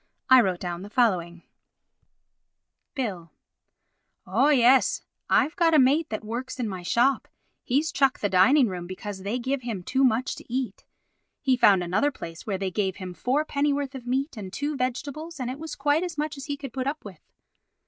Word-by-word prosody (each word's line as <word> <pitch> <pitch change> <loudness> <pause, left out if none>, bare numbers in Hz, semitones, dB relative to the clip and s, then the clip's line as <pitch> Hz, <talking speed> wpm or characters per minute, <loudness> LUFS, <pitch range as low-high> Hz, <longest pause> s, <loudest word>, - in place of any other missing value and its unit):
I 260 -1 +9
wrote 185 -5 -1
down 175 -1 -4
the 200 - -9
following:— 180 -8 +1 1.5
Bill: 195 -11 -4 1.0
Oh, 235 +10 +2
yes. 260 -2 +4 0.3
I've 315 - +3
got 330 -2 +3
a - - +7
mate 290 +4 +3
that 215 - -4
works 245 +4 -5
in 240 - -1
my 190 -3 -5
shop; 245 +9 +1 0.4
he's 290 +6 0
chucked 275 -2 +2
the 205 - +2
Dining 205 +9 +5
Room 180 -3 -5
because 190 +2 -6
they 205 +5 -2
give 260 +2 -2
him 225 -7 -5
too 265 +8 +1
much 250 +1 +2
to - - -13
eat. 255 0 -3 0.5
He 265 -2 +2
found 200 -7 +5
another 195 +12 +1
place 165 - -9
where 200 -3 -1
they 190 -1 -3
gave 190 -1 -1
him 185 -2 -7
four 255 - 0
pennyworth 285 -1 -1
of 255 -2 -9
meat 265 +2 -1
and 195 -3 -7
two 290 +8 -3
vegetables 285 +5 -4
and 250 -1 -2
it 265 - -7
was 320 0 -6
quite 290 +3 +2
as 350 -3 -4
much 300 +1 -2
as 275 - -8
he 285 -2 -4
could 275 -4 -8
put 260 +1 -3
up 295 -2 -4
with. 190 -6 -10
255 Hz, 190 wpm, -26 LUFS, 195-280 Hz, 1.5 s, I